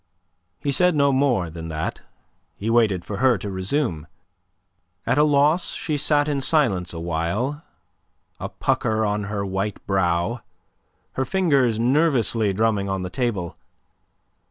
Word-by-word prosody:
He 140 - -1
said 180 +4 +3
no 140 -1 +3
more 125 - +1
than 80 0 -7
that. 80 -1 -4 0.6
He 110 +3 -2
waited 105 -7 +2
for 100 - -5
her 130 -1 +3
to 100 +1 -6
resume. 95 - -2 1.0
At 145 - +1
a - - +6
loss, 150 +4 +3
she 155 - -2
sat 145 0 +2
in 145 -2 -1
silence 120 - +2
awhile, 85 - -2 0.8
a - - -4
pucker 110 0 0
on 105 0 -1
her 100 -1 -3
white 95 +1 -3
brow, 95 +4 0 0.7
her 130 - -1
fingers 140 - +2
nervously 120 -5 +2
drumming 105 -1 0
on 95 -1 -2
the 90 - -5
table. 115 -10 -2
110 Hz, 135 wpm, -23 LUFS, 95-140 Hz, 1.0 s, a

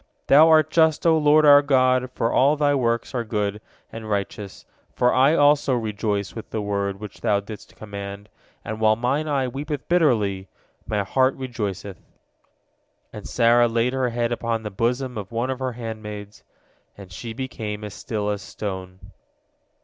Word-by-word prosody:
Thou 155 +4 +7
art 155 -1 +4
just, 160 -1 +3
O 165 -1 +5
Lord 155 0 +4
our 145 -1 +8
God, 130 -2 +2
for 115 - 0
all 140 +3 +4
Thy 145 -1 +2
works 115 -3 -1
are 120 -2 -1
good 105 -2 -2 0.3
and 110 -1 -8
righteous, 100 -1 -4 0.3
for 125 0 +2
I 135 +5 +4
also 145 -3 +3
rejoice 105 -3 -2
with 110 - -9
the 110 - -3
word 100 -1 -2
which 105 -2 -10
Thou 100 - +2
didst 105 0 -11
command, 100 -1 -8 0.4
and 110 +1 -5
while 110 0 +4
mine 130 +7 -1
eye 140 -3 0
weepeth 145 +3 -5
bitterly, 110 - +1 0.4
my 105 -2 0
heart 130 +6 +1
rejoiceth." 105 -8 -5 1.1
And - - -8
Sarah 120 0 +4
laid 115 +2 0
her 130 -1 0
head 120 0 -1
upon 115 -1 -2
the 105 - -5
bosom 125 +3 -1
of 100 -2 -8
one 120 +3 -1
of 130 - -5
her 130 -1 -3
handmaids, 110 -3 -8 0.5
and 95 -2 -12
she 115 +5 -7
became 110 -4 -5
as 105 - -7
still 105 -3 -3
as 100 -1 -4
a - - -11
stone. 95 -1 -7
115 Hz, 170 wpm, -23 LUFS, 105-130 Hz, 1.1 s, our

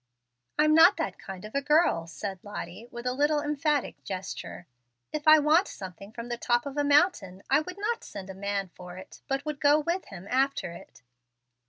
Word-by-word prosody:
"I'm 305 0 +4
not 325 +1 +7
that - - -3
kind 190 0 -8
of 215 - -10
a 280 - +1
girl," 290 - +3
said 190 +2 -6
Lottie, 205 +1 -7
with 240 0 -8
a 250 - 0
little 295 +3 +2
emphatic 295 -1 -1
gesture. 185 -2 -6 0.5
"If 305 0 -4
I 310 0 +10
wanted 310 +6 +4
something 190 +2 -9
from 235 +1 -7
the 240 0 -3
top 240 +1 +1
of 280 -1 -6
a 290 - +1
mountain, 285 - +2
I 275 - +6
would 365 +4 -6
not 455 +3 -2
send 195 -2 -8
a 190 - -7
man 200 0 -3
for 180 0 -10
it, 185 - -12
but 275 0 -2
would 300 -2 -4
go 290 +1 +5
with 340 +5 -2
him 190 -2 -10
after 270 -7 +1
it. 170 -6 -13
270 Hz, 200 wpm, -28 LUFS, 195-300 Hz, 0.5 s, I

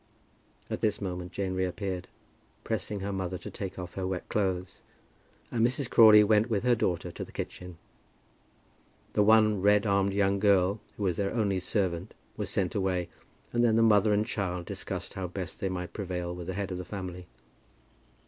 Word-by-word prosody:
At - - -4
this 105 -1 +1
moment 90 -2 -4
Jane 95 -2 -2
reappeared, 95 0 -2 0.6
pressing 105 -2 -3
her 100 +1 -3
mother 95 -1 -3
to - - -9
take 95 -2 -6
off 90 -1 -6
her 95 -1 -3
wet 95 -2 -4
clothes, 95 -3 -1 0.7
and 115 -2 +1
Mrs. 125 +2 +1
Crawley 110 -2 +8
went 105 +2 +3
with 105 -2 0
her 125 -1 +4
daughter 90 -6 -1
to - - -6
the - - -11
kitchen. 90 -2 -7 1.4
The - - +3
one 110 -1 +5
red 105 +1 +4
armed 100 -1 +2
young 100 0 +2
girl 100 0 +3 0.2
who 105 - -3
was 90 -4 0
their 100 +2 -1
only 100 -5 +1
servant 90 -3 -2 0.2
was - - -3
sent 90 -2 0
away, 95 -3 -1 0.4
and 120 0 +2
then 115 -2 +4
the 115 - +4
mother 105 -1 +5
and 105 +1 +2
child 90 -5 -3
discussed 95 -2 -5
how 95 -2 -4
best 90 +1 -6
they 95 - -1
might 90 -1 -5
prevail 90 -3 -3
with 90 -1 -7
the 95 - -3
head 100 -1 -3
of 90 - -4
the - - -4
family. 90 -1 -7
95 Hz, 185 wpm, -29 LUFS, 90-105 Hz, 1.4 s, Crawley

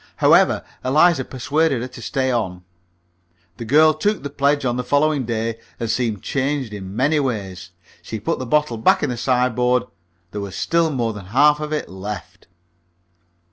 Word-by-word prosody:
However, - - +4 0.2
Eliza 150 +2 +4
persuaded 135 +1 0
her - - -4
to 125 - -11
stay 130 +1 -1
on. 95 -7 -2 0.9
The 115 - -6
girl 155 +6 +5
took 205 +3 -1
the 140 - -5
pledge 140 0 +1
on 120 -1 0
the 125 - -2
following 145 0 +1
day, 115 0 -2 0.2
and 115 -1 -1
seemed 110 -5 -2
changed 135 -4 -2
in 95 -1 -7
many 145 +6 +2
ways. 95 -9 -4 0.3
She 110 - -6
put 105 - -2
the 130 - -5
bottle 150 -4 +1
back 110 - +3
in 145 - 0
the - - -3
sideboard; 125 0 +1 0.5
there 105 - -5
was 100 -3 -6
still 165 -1 +1
more 120 -6 -1
than 100 -3 -9
half 145 +7 +4
of 150 0 -5
it 150 - -2
left. 95 +1 -8
125 Hz, 175 wpm, -21 LUFS, 110-145 Hz, 0.9 s, girl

